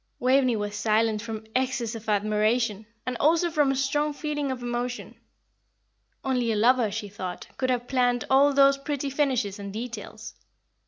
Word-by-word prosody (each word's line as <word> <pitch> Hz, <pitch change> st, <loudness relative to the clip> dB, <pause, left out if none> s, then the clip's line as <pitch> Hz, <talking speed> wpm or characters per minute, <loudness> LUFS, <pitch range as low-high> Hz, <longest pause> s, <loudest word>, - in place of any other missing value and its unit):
Waveney 255 Hz, -1 st, +3 dB
was 205 Hz, -1 st, -3 dB
silent 215 Hz, +1 st, +1 dB
from 220 Hz, -1 st, -6 dB
excess 255 Hz, -3 st, 0 dB
of 225 Hz, -1 st, -7 dB
admiration, 215 Hz, +1 st, +1 dB, 0.2 s
and 255 Hz, +1 st, -2 dB
also 335 Hz, +3 st, +3 dB
from 295 Hz, -3 st, +2 dB
a -, -, 0 dB
strong 290 Hz, +3 st, 0 dB
feeling 295 Hz, -1 st, -3 dB
of 250 Hz, -2 st, -5 dB
emotion. 245 Hz, +1 st, -3 dB, 1.1 s
Only 250 Hz, -3 st, 0 dB
a -, -, 0 dB
lover, 235 Hz, +1 st, +3 dB
she 210 Hz, +1 st, -4 dB
thought, 190 Hz, -3 st, -6 dB
could 255 Hz, -, -1 dB
have 245 Hz, -1 st, -1 dB
planned 245 Hz, -2 st, +1 dB
all 275 Hz, +2 st, +5 dB
those 275 Hz, 0 st, +5 dB
pretty 280 Hz, 0 st, -3 dB
finishes 255 Hz, -8 st, 0 dB
and 200 Hz, 0 st, -6 dB
details. 225 Hz, 0 st, -7 dB
245 Hz, 160 wpm, -26 LUFS, 215-270 Hz, 1.1 s, all